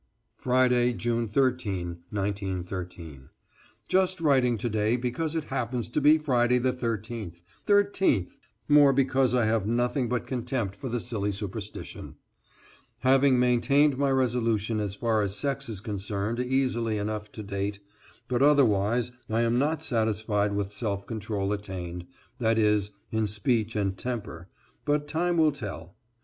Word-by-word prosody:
=Friday, 125 -1 +2
June 115 0 -1
13, 105 -9 0
1913.= 90 -7 -4 0.6
Just 185 -1 +2
writing 130 -7 +3
to 115 - -2
day 110 +1 +1
because 130 +6 -2
it 160 - -1
happens 120 -2 -2
to 150 - 0
be 150 +2 +6
Friday 125 -5 +2
the 125 +1 +1
13th 110 -7 -4 0.2
13th 200 - +2 0.3
more 145 -2 +6
because 130 -1 +2
I 120 -3 +3
have 110 -2 +1
nothing 120 +2 0
but 125 0 -1
contempt 120 -5 -2
for 130 +6 -6
the 120 +1 -1
silly 105 -3 -2
superstition. 100 -1 -7 0.9
Have 130 +1 +4
maintained 135 +2 +4
my 140 +1 +1
resolution 115 -4 +1
as 100 -2 -3
far 110 -1 +1
as 100 -1 -2
sex 140 +3 -2
is 105 -4 -6
concerned 105 +1 -3
easily 125 -4 0
enough 105 0 -4
to 110 - -7
date, 100 0 -3 0.5
but 125 0 0
otherwise 120 -5 +3 0.2
I 110 +1 +1
am 120 +1 +2
not 155 +3 0
satisfied 110 -4 0
with 100 0 -2
self 100 -2 -3
control 105 -2 -2
attained, 90 -4 -6 0.3
that 115 -2 +2
is, 105 -2 +2 0.2
in 110 -1 0
speech 110 +1 0
and 100 -2 0
temper, 105 -7 -5 0.4
but 145 0 0
time 170 +3 0
will 155 -2 +5
tell. 100 - -8
115 Hz, 140 wpm, -27 LUFS, 105-130 Hz, 0.9 s, be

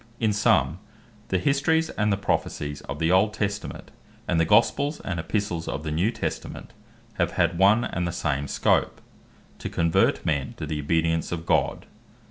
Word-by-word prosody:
In 110 -2 +2
summe, 85 -6 +2 0.5
the 95 - +1
Histories 150 - +1
and 105 0 0
the 100 - +2
Prophecies 75 -6 -2
of 70 - -3
the 80 +2 +1
old 100 +4 +3
Testament, 105 -1 -4 0.4
and 85 -2 +1
the 80 - +3
Gospels, 130 - +3
and 90 -4 -2
Epistles 85 -1 -2
of 75 - -4
the 75 - -3
New 85 +8 +1
Testament, 120 - -5 0.5
have - - +1
had 85 -1 +1
one 105 +5 +5
and 90 -1 -2
the - - -2
same 70 -4 -2
scope, - - +1 0.6
to - - -5
convert 85 -1 +2
men 70 -4 -1
to - - -4
the 75 -1 -3
obedience 80 +2 0
of 85 -1 -4
God; - - +1
1. - - -20
85 Hz, 175 wpm, -25 LUFS, 80-105 Hz, 0.6 s, one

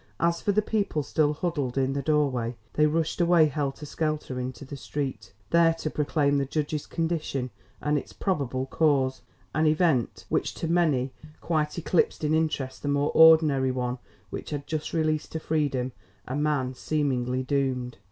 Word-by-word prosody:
As 170 0 +1
for 205 - +1
the 210 +1 +2
people 200 -9 0
still 150 +1 +2
huddled 145 -5 -2
in 135 0 +1
the 140 - -1
doorway, 135 -6 0 0.2
they 150 0 +4
rushed 165 +2 0
away 170 -2 +5
helter 145 0 -2
skelter 155 -4 -2
into 130 +3 -5
the 140 - -7
street, 140 0 -4 0.2
there 165 -1 +5
to 155 -2 -4
proclaim 145 -1 +1
the 140 - 0
judge's 150 +1 -2
condition 160 -6 -2 0.3
and 150 0 +1
its - - -12
probable 135 -9 -1
cause; 135 -3 +1 0.3
an 155 0 +2
event 155 - +1
which - - -1
to 165 - -3
many 155 -7 +2 0.3
quite 155 -2 -1
eclipsed 170 -1 +1
in 150 +1 +1
interest 155 -5 -1
the - - -4
more 145 +1 +1
ordinary 155 -5 +6
one 125 -1 -2 0.3
which - - -6
had 145 -2 -4
just 155 -1 -3
released 155 -2 0
to 160 - -2
freedom 145 -5 -1 0.4
a 130 - -3
man 145 -3 0
seemingly 130 -3 -1
doomed. 130 -2 -1
150 Hz, 165 wpm, -27 LUFS, 130-160 Hz, 0.4 s, ordinary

